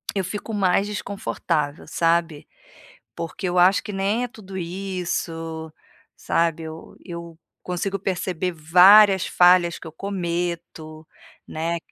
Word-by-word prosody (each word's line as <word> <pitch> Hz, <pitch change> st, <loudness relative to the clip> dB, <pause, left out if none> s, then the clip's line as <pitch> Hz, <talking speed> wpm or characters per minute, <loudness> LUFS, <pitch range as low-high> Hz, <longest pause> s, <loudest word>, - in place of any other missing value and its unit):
eu 195 Hz, -, 0 dB
fico 210 Hz, +4 st, -5 dB
mais 195 Hz, 0 st, +2 dB
desconfortável, 170 Hz, -7 st, -3 dB
sabe. 165 Hz, -2 st, 0 dB, 0.7 s
Porque 170 Hz, +3 st, -5 dB
eu 180 Hz, 0 st, -1 dB
acho 185 Hz, +2 st, +5 dB
que 210 Hz, -, -7 dB
nem 200 Hz, +5 st, 0 dB
é -, -, -5 dB
tudo 195 Hz, -6 st, -10 dB
isso 170 Hz, -3 st, -4 dB, 0.5 s
sabe, 165 Hz, -1 st, 0 dB
eu 160 Hz, 0 st, -10 dB
eu 170 Hz, -2 st, -9 dB, 0.2 s
consigo 190 Hz, +2 st, -2 dB
perceber 185 Hz, -2 st, -2 dB
várias 185 Hz, +5 st, +6 dB
falhas 175 Hz, -1 st, +4 dB
que 165 Hz, -, -10 dB
eu -, -, -9 dB
cometo, 170 Hz, -4 st, -4 dB, 0.4 s
né. 165 Hz, +2 st, -2 dB
175 Hz, 120 wpm, -23 LUFS, 165-195 Hz, 0.7 s, várias